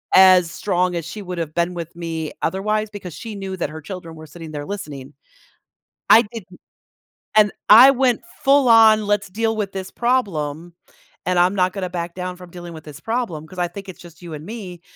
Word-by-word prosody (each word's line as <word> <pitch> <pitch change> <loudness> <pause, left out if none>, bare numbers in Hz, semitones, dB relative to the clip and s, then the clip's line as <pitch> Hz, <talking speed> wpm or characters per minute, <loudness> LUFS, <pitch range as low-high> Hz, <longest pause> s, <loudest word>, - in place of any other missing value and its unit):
as 185 -2 +7
strong 180 -1 0
as 170 - -2
she 205 +6 -7
would've 170 -4 -5
been 170 +1 0
with 170 -2 -6
me 165 -2 -4
otherwise, 215 +3 -1
because 190 -5 -8
she 225 -2 -7
knew 195 -1 -5
that 170 - -2
her 160 +1 -8
children 170 -1 -8
were 155 0 -11
sitting 160 +1 -10
there 145 -1 -5
listening. 150 -9 -7 1.0
I 225 - +9
didn't 185 -6 -10 0.8
and 210 -1 +5 0.2
I 240 +6 +10
went 255 -3 +1 0.2
full-on, 225 -6 +6
"Let's 205 -1 +1
deal 225 +3 -1
with 205 -2 -3
this 190 -1 -6
problem, 175 - -1 0.5
and 180 0 +1
I'm 180 +2 +4
not 185 -1 +1
gonna 190 -3 -4
back 170 -1 -5
down 180 0 -4
from 180 -1 -13
dealing 175 -1 -9
with 160 -1 -10
this 150 -2 -11
problem, 215 -7 -3
'cause 185 - -14
I 175 - +1
think 195 +2 -9
it's 185 - -10
just 170 -1 -15
you 170 -2 -8
and 150 +1 -9
me," 190 -5 -8
180 Hz, 195 wpm, -21 LUFS, 170-210 Hz, 1.0 s, I